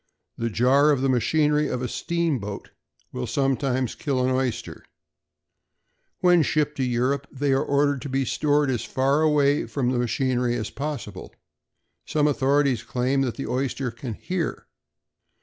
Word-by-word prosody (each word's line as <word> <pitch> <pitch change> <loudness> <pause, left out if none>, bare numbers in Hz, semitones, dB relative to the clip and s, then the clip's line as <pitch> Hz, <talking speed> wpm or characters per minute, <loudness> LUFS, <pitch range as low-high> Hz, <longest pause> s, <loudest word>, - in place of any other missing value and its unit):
The 115 0 -2
jar 130 +7 +4
of 140 -3 +2
the 135 - +1
machinery 150 +5 +2
of 125 - -3
a - - -1
steamboat 140 -12 -2 0.4
will 65 - -4
sometimes 135 -2 0
kill 130 -3 -1
an 130 - +1
oyster. 130 -2 -2 1.4
When 180 -2 +5
shipped 150 -1 0
to 135 - 0
Europe 130 +3 0
they 140 0 0
are 135 - +2
ordered 145 -1 +1
to 140 - -6
be 135 +1 0
stored 145 +1 +1
as 120 - -2
far 135 +3 +1
away 145 -2 +2
from 125 -3 -1
the 125 - 0
machinery 125 0 0
as 110 -2 -4
possible. 135 -9 -6 0.7
Some 150 -1 +1
authorities 140 -3 +2
claim 130 +3 0
that 125 -4 -1
the 135 - -5
oyster 130 0 -2
can 115 0 -6
hear. 180 - -3
135 Hz, 150 wpm, -24 LUFS, 125-145 Hz, 1.4 s, When